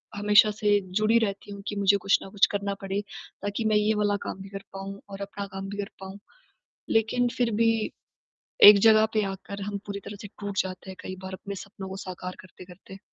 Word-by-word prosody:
हमेशा 210 +1 +5
से 205 -1 +2 0.2
जुड़ी 215 +2 +4
रहती 205 -2 -3
हूँ 200 0 -8
कि 205 - -3
मुझे 200 0 +4
कुछ 195 0 +3
न - - -9
कुछ 195 0 +4
करना 200 0 -2
पड़े 195 +1 -2 0.4
ताकि 205 +3 -3
मैं 215 -1 +3
ये 210 +1 +3
वाला 205 -1 +1
काम 190 - -5
भी 195 - -9
कर 195 0 -7
पाऊँ 195 +1 -7
और 200 0 -8
अपना 200 0 -5
काम 195 0 -5
भी 205 - -6
कर 205 -1 -4
पाऊँ। 190 +1 -9 0.7
लेकिन 225 +2 +2
फिर 240 -2 +1
भी 230 - +5 1.0
एक 205 0 +12
ज़गह 220 0 +6
पे 215 - +3
आकर 200 +1 -8
हम 200 0 -3
पूरी 200 0 -5
तरह 205 +1 -7
से 205 - -8
टूट 205 -1 -4
जाते 185 0 -8
हैं 190 - -9
कई 185 - -6
बार, 190 0 -7
अपने 200 +1 -7
सपनों 195 0 -8
को 190 - -6
साकार 185 -1 -7
करते-करते। 185 +1 -13
200 Hz, 215 wpm, -27 LUFS, 195-210 Hz, 1.0 s, एक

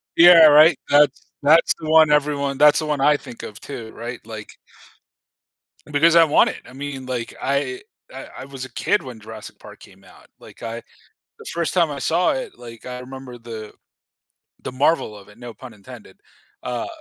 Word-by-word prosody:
Yeah, 170 -1 +8
right, 155 +1 +6
that's 145 -1 +3 0.2
that's 160 +4 +4
the 155 -1 -6
one 160 -1 +6
everyone 140 -2 0
that's 150 0 +5
the 155 - -3
one 150 -2 -2
I 150 +1 +4
think 120 - -12
of 105 +2 -9
too, 115 -6 -9
right? 120 +2 -7
Like 110 -2 -10 1.3
Because 155 +3 +2
I 170 - +8
want 150 - +3
it, - - -8
I 125 - -14
mean, 135 -1 -7
like, 125 -3 -5
I 140 - -2 0.3
I - - -9
I 130 - -8
was 135 -1 -8
a 130 - -14
kid 205 - 0
when 125 -4 -10
Jurassic 110 0 -11
Park - - -14
came - - -18
out, - - -19
like - - -16
I 115 +1 -6 0.6
the - - -13
first 170 -1 -2
time 170 -5 +2
I 140 - -6
saw 165 +6 +1
it, - - -6
like, 115 -1 -12
I 125 0 -7
remember 130 -1 -10
the 115 -2 -9 0.9
the - - -6
marvel 130 -5 0
of 100 -1 -15
it- 105 +3 -18
no 120 -1 -9
pun 120 +1 -12
intended- 100 -2 -14 0.4
uh, 125 - -4
140 Hz, 190 wpm, -21 LUFS, 120-150 Hz, 1.3 s, Yeah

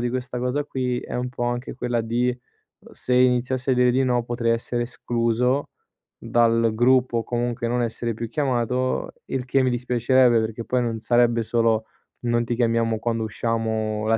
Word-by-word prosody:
di 120 0 -1
questa 125 0 -4
cosa 125 +4 -1
qui, 125 -3 -2
è - - -8
un 125 +1 -2
po' 120 -1 -3
anche 120 +1 -3
quella 125 -1 -1
di: 120 +2 0 0.5
uhm, - - -17
se 125 - -2
iniziassi 125 +1 +2
a 130 - +4
dire 125 0 +3
di 130 - +2
no 125 -2 +1
potrei 120 -1 -1
essere 120 +1 -2
escluso 120 +2 0 0.5
dal 115 -1 +2
gruppo 125 +1 +3
o 115 - -3
comunque 120 0 -2
non 120 +1 0
essere 115 0 -2
più 115 +1 -5
chiamato, 130 -1 -1
il 130 -2 -3
che 130 +1 +2
mi 130 - +2
dispiacerebbe, 125 0 +3
perché 110 +1 -4
poi 125 -1 0
non 115 -2 -2
sarebbe 120 0 +2
solo: 115 -1 +1 0.4
"Non 120 -1 +1
ti 120 0 -2
chiamiamo 115 -1 +1
quando 115 -1 -1
usciamo 110 -1 -2
la 115 0 +3
120 Hz, 180 wpm, -23 LUFS, 115-125 Hz, 0.5 s, a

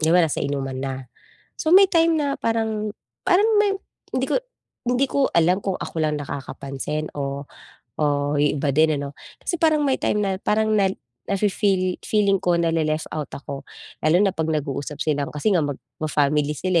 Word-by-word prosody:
di 155 - +2
ba 180 +2 +6
nasa 155 - -2
inuman 135 -2 -2
na, 135 0 -2 0.7
so 315 - 0
may 395 0 +8
time 330 -1 +4
na 285 -2 0
parang, 220 -2 0 0.4
parang 380 +3 +5
may 405 -1 +2 0.4
hindi - - +1
ko - - +4 0.5
hindi 250 +3 +3
ko 275 0 +2
alam 175 +3 +4
kung 195 -2 0
ako - - -6
lang 150 -1 +1
nakakapansin 140 +2 -4
o 140 0 -3 0.5
o - - +3 0.4
yung 150 0 +2
iba 140 - +1
din 155 +1 +3
ano. 140 0 -5 0.3
Kasi 345 - -2
parang 310 -3 +3
may 270 - +2
time - - +1
na 195 - 0
parang 215 +1 +2
nel 195 -2 +2 0.3
na-fe-feel 195 -2 +1
feeling 200 -2 +2
ko 175 -1 +2
na-le-left 165 -2 +1
out 155 -2 -3
ako 140 0 -7 0.4
lalo 155 +2 +4
na 195 - +2
pag 160 -3 -2
nag-uusap 145 -1 -2
silang 145 -2 0
kasi 150 +9 +1
nga 175 - +4
mag 145 -2 -2 0.2
ma-family 150 -1 +1
sila 185 -2 +1
165 Hz, 180 wpm, -23 LUFS, 145-215 Hz, 0.7 s, may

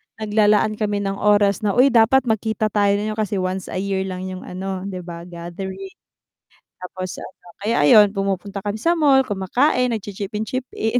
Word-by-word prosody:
naglalaan 215 0 +2
kami 205 -1 -1
ng 195 0 -3
oras 205 -2 +3
na, 205 -2 -1
"Uy 265 +3 +5
dapat 240 +3 +4
magkita 220 -2 -1
tayo 200 -1 +2
niyo 210 +1 -2
kasi 210 -1 -1
once 185 0 -2
a - - -7
year 190 0 -2
lang 185 -1 -5
yung 185 0 -7
ano 190 +1 -5
'di 185 -2 -6
ba, 170 0 -9
gathering." 180 - -7 0.9
Tapos 185 0 -6
ano, 185 - -12 0.2
kaya 225 +3 0
ayun 205 +1 +7
pumupunta 195 0 -3
kami 205 +1 -4
sa 235 +10 +1
mall, 290 -6 +4
kumakain, 245 +4 +1
nagchi-chip 205 0 -6
in-chip 250 +4 -3
in. 225 +3 0
205 Hz, 175 wpm, -21 LUFS, 190-220 Hz, 0.9 s, ayun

